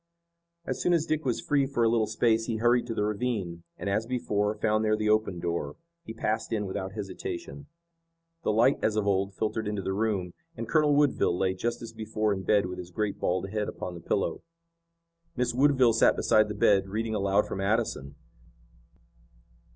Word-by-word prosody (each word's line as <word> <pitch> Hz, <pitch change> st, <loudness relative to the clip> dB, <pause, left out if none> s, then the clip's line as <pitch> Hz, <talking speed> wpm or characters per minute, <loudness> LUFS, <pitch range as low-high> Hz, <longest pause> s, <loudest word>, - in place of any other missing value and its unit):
As -, -, -3 dB
soon 175 Hz, -, +2 dB
as 165 Hz, -2 st, +2 dB
Dick 155 Hz, -2 st, -1 dB
was 125 Hz, -3 st, 0 dB
free 140 Hz, -2 st, +1 dB
for 125 Hz, -4 st, 0 dB
a -, -, +4 dB
little 115 Hz, -1 st, +2 dB
space 115 Hz, 0 st, +2 dB
he 115 Hz, -, -1 dB
hurried 120 Hz, +2 st, +2 dB
to 115 Hz, -, -3 dB
the 105 Hz, -, 0 dB
ravine, 105 Hz, -5 st, -2 dB, 0.2 s
and, -, -, -5 dB
as 105 Hz, +3 st, 0 dB
before, 105 Hz, -4 st, 0 dB
found 110 Hz, +1 st, +1 dB
there 110 Hz, 0 st, +2 dB
the 105 Hz, 0 st, +1 dB
open 110 Hz, -5 st, +1 dB
door. 85 Hz, -4 st, -3 dB, 0.3 s
He -, -, -7 dB
passed 110 Hz, 0 st, -2 dB
in 105 Hz, -2 st, -1 dB
without 95 Hz, 0 st, -4 dB
hesitation. 145 Hz, -, -6 dB, 0.7 s
The -, -, 0 dB
light 120 Hz, +6 st, +3 dB
as 110 Hz, -, +1 dB
of 105 Hz, -1 st, 0 dB
old 100 Hz, 0 st, 0 dB
filtered 110 Hz, +1 st, -2 dB
into 105 Hz, -2 st, -3 dB
the 95 Hz, -, -2 dB
room, 100 Hz, -4 st, -1 dB, 0.2 s
and 115 Hz, -, -4 dB
Colonel 150 Hz, +1 st, +3 dB
Woodville 140 Hz, -11 st, +2 dB
lay 95 Hz, 0 st, +1 dB
just 115 Hz, +6 st, -3 dB
as 115 Hz, -, -8 dB
before 110 Hz, -1 st, -1 dB
in 95 Hz, -, -4 dB
bed 100 Hz, +1 st, +2 dB
with 90 Hz, 0 st, -6 dB
his 90 Hz, -1 st, -7 dB
great 105 Hz, +2 st, -2 dB
bald 95 Hz, +2 st, -1 dB
head 105 Hz, -1 st, -1 dB
upon 90 Hz, -, -6 dB
the 85 Hz, -, -9 dB
pillow. 100 Hz, +3 st, -1 dB, 0.9 s
Miss 125 Hz, -1 st, 0 dB
Woodville 130 Hz, -2 st, +4 dB
sat 115 Hz, -, +4 dB
beside 110 Hz, 0 st, +3 dB
the 105 Hz, -, -5 dB
bed, 100 Hz, -1 st, +3 dB
reading 110 Hz, +2 st, -2 dB
aloud 100 Hz, 0 st, +2 dB
from 95 Hz, -, -4 dB
Addison. 100 Hz, -, -1 dB
110 Hz, 195 wpm, -28 LUFS, 100-120 Hz, 0.9 s, a